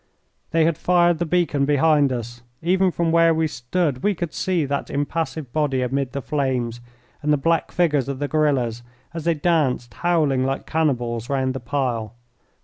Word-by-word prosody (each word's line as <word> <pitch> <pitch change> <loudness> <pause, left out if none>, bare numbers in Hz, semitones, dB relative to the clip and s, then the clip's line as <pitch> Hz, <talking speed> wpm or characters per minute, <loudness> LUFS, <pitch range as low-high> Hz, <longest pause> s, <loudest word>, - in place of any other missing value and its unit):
They 165 -1 +3
had 165 -1 0
fired 175 -2 +3
the 170 - -1
beacon 160 -5 +1
behind 145 -1 +3
us. 120 -1 -5 0.2
Even 185 +2 +3
from 170 -1 -1
where 165 0 +4
we 160 0 +1
stood 140 0 -2
we 205 -1 +1
could 170 -2 -4
see 180 -5 0
that 140 0 -3
impassive 145 -2 -3
body 145 -4 +1
amid 135 +1 -2
the 140 -2 -4
flames, 125 -5 -1 0.4
and 150 0 0
the 150 - +4
black 165 +4 0
figures 145 -7 +1
of 140 - -3
the 145 +1 -2
guerillas 135 -7 +1 0.3
as 165 -2 -6
they 170 -1 +2
danced, 145 - 0
howling 150 - +1
like 135 +1 -2
cannibals, 120 -6 -1
round 130 -2 0
the 130 - -4
pile. 120 -4 -2
145 Hz, 175 wpm, -22 LUFS, 130-165 Hz, 0.4 s, where